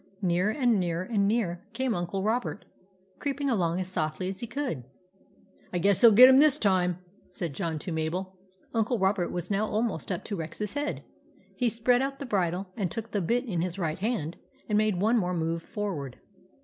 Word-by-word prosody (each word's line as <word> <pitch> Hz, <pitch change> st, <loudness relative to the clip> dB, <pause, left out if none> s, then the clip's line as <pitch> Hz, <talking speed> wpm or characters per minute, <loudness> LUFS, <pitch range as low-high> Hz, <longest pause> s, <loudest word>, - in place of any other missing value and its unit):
Nearer 180 Hz, +2 st, +2 dB
and 240 Hz, -3 st, +2 dB
nearer 175 Hz, -1 st, -1 dB
and 200 Hz, 0 st, +1 dB
nearer 200 Hz, -6 st, 0 dB
came 260 Hz, -2 st, 0 dB
Uncle 185 Hz, +1 st, -2 dB
Robert, 220 Hz, 0 st, -1 dB, 0.5 s
creeping 280 Hz, -1 st, -1 dB
along 175 Hz, -5 st, +1 dB
as 185 Hz, -, -3 dB
softly 170 Hz, 0 st, -2 dB
as 190 Hz, 0 st, -6 dB
he 235 Hz, -, -5 dB
could. 240 Hz, -, -3 dB, 0.4 s
" -, -, -31 dB
I 180 Hz, -, -1 dB
guess 195 Hz, +2 st, +3 dB
he 235 Hz, -, +10 dB
'11 220 Hz, -, +6 dB
get 250 Hz, +4 st, +11 dB
him 265 Hz, 0 st, +7 dB
this 300 Hz, -1 st, +6 dB
time," 185 Hz, -, +2 dB, 0.3 s
said 175 Hz, -4 st, -5 dB
John 165 Hz, -1 st, -2 dB
to 175 Hz, -, -6 dB
Mabel. 175 Hz, +4 st, -3 dB, 0.4 s
Uncle 230 Hz, +2 st, +1 dB
Robert 190 Hz, -2 st, +1 dB
was 175 Hz, +2 st, -4 dB
now 205 Hz, +2 st, +1 dB
almost 215 Hz, -6 st, -2 dB
up 180 Hz, -, -3 dB
to 205 Hz, -, -4 dB
Rex's 170 Hz, +5 st, -4 dB
head. 290 Hz, +1 st, -3 dB, 0.5 s
He 245 Hz, -2 st, +1 dB
spread 240 Hz, +2 st, +2 dB
out 275 Hz, 0 st, -2 dB
the 280 Hz, -, -6 dB
bridle 185 Hz, -4 st, -1 dB
and 195 Hz, -6 st, -1 dB
took 225 Hz, +5 st, -6 dB
the 205 Hz, -, 0 dB
bit 240 Hz, +9 st, 0 dB
in 180 Hz, -8 st, -2 dB
his 180 Hz, +1 st, -3 dB
right 165 Hz, -3 st, -2 dB
hand 195 Hz, -7 st, -2 dB, 0.3 s
and 210 Hz, -, 0 dB
made 210 Hz, -3 st, +2 dB
one 225 Hz, +4 st, +3 dB
more 180 Hz, -2 st, -1 dB
move 165 Hz, 0 st, -1 dB
forward. 165 Hz, -, -5 dB
195 Hz, 200 wpm, -28 LUFS, 175-230 Hz, 0.5 s, get